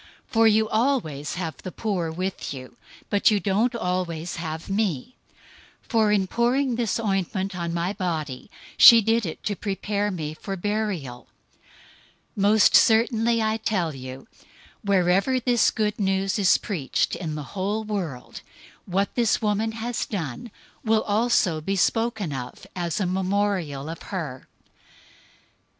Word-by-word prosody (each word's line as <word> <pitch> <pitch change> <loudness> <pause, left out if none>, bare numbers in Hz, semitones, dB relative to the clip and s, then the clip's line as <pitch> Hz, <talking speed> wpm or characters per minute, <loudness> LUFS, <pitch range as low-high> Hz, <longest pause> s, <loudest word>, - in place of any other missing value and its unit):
026:011 - - -25
For 225 -1 +5
you 220 0 +3
always 215 - 0
have 170 -3 -4
the 185 - -8
poor 185 -5 -2
with 185 -2 -4
you; 130 -1 -10 0.4
but 205 - +4
you 210 -2 +2
don't 215 +5 +1
always 180 -5 -2
have 160 -1 -5
me. 195 - -1 0.7
026:012 - - -30
For 220 -3 +3
in 200 -2 +2
pouring 245 +5 +1
this 230 -3 -1
ointment 195 -2 -1
on 170 -1 -3
my 170 +3 -1
body, 160 -7 -4 0.3
she 230 - +10
did 225 -1 +1
it 160 - -7
to 205 - -1
prepare 205 +1 -2
me 155 -6 -4
for 195 +5 -6
burial. 190 - -3 1.1
026:013 200 - -3
Most 210 +1 +5
certainly 230 0 +4
I 220 0 +1
tell 190 -8 -1
you, 130 +4 -9 0.6
wherever 195 +5 +2
this 245 -1 +3
Good 210 -1 -1
News 195 0 0
is 190 -2 +5
preached 170 - -1
in 160 -4 -4
the 150 - -5
whole 205 +3 -1
world, 180 -12 -5 0.5
what 195 +2 0
this 235 -4 +2
woman 215 +1 0
has 230 +1 -3
done 175 - -5 0.3
will 220 -1 +2
also 205 -7 +1
be 195 +5 -1
spoken 220 -4 0
of 125 -2 -7
as 175 -1 -2
a 200 - 0
memorial 185 -6 -1
of 165 +1 -7
her." 150 -10 -5
195 Hz, 145 wpm, -24 LUFS, 170-220 Hz, 1.1 s, she